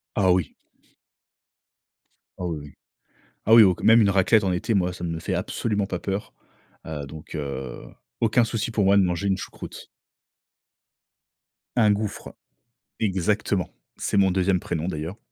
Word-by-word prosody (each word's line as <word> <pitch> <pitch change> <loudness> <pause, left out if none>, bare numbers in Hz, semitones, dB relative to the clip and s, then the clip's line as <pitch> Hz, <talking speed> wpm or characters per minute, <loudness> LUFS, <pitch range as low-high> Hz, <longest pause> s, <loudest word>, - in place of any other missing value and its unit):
Ah 95 -3 +3
oui! 90 -5 0 1.9
Ah 90 - -4
oui, 80 -3 -3
oui. 75 0 -12 0.7
Ah, 110 - +5
oui 115 - +10
au 95 -3 +4
q - - -12
même 115 +1 +7
une 100 - +4
raclette 100 +3 +4
en 95 - +1
été, 90 +5 -1
moi, 90 -3 +1
ça 90 0 -9
ne 85 - -2
me 80 - -4
fait - - -2
absolument 105 -3 -1
pas 90 -2 -4
peur. 100 +3 -4 0.5
Heu, 75 -3 -5
donc 75 +3 -10
heu, 70 -4 -5 0.4
aucun 115 +1 +4
souci 115 0 -2
pour 105 -3 +1
moi 100 +1 +5
de 100 - +5
manger 90 +2 -1
une 95 -1 +1
choucroute. - - -9 1.9
Un 110 -3 +5
gouffre. 105 -1 -4 0.7
Exactement. 100 -1 0 0.3
C'est - - -1
mon 95 -1 +5
2e 95 0 +2
prénom 85 -1 -3
d'ailleurs. 80 +3 -4
95 Hz, 160 wpm, -24 LUFS, 85-105 Hz, 1.9 s, oui